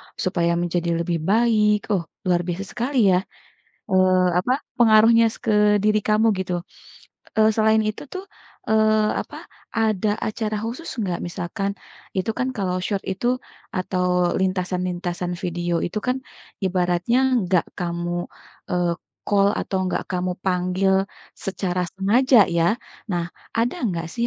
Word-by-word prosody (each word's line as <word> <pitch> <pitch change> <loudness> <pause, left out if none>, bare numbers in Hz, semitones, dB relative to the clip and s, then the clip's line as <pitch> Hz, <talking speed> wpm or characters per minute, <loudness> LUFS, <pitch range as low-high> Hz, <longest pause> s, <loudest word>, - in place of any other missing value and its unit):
supaya 170 -2 0
menjadi 175 0 -1
lebih 170 -1 -1
baik. 215 -2 +3
Oh, 185 -4 +1 0.2
luar 175 -2 +2
biasa 180 +3 -2
sekali 240 -5 +2
ya, 180 - +4 0.7
eee, 185 -1 +4
apa, 215 +8 +2 0.2
pengaruhnya 230 -1 +6
s - - -13
ke 210 -2 +3
diri 215 +1 +3
kamu 215 +1 +3 0.2
gitu, 175 -1 -2 0.8
eee, 215 - +6
selain 220 0 +4
itu 215 +4 -3
tuh, 375 +1 -5 0.5
eee, 215 -1 +3
apa, - - -11 0.4
ada 215 -2 +1 0.2
acara 215 -1 -2
khusus 250 +9 -5
nggak, 180 -4 -2
misalkan 175 +3 -3 0.4
itu 190 +4 0
kan 255 - 0
kalau 185 -3 -1
short 195 +1 -2
itu 240 +7 0 0.4
atau 180 -1 +1
lintasan-lintasan 180 -1 -2
video 175 0 -2
itu 195 +5 -3
kan 250 +1 +1 0.5
ibaratnya 180 +5 +1 0.3
nggak 180 -1 +2
kamu, 175 0 -2 0.5
eee, 175 -1 +1 0.3
call 200 -1 +4
atau 190 - -2
nggak - - -2
kamu 180 0 -1
panggil 185 +1 +1 0.4
secara 185 -2 -2
sengaja 220 +3 +5
ya. 170 +7 +2 0.3
Nah, 170 -1 -1 0.3
ada 240 +9 +1
nggak 165 -2 -3
sih 235 0 0
190 Hz, 135 wpm, -23 LUFS, 180-215 Hz, 0.8 s, pengaruhnya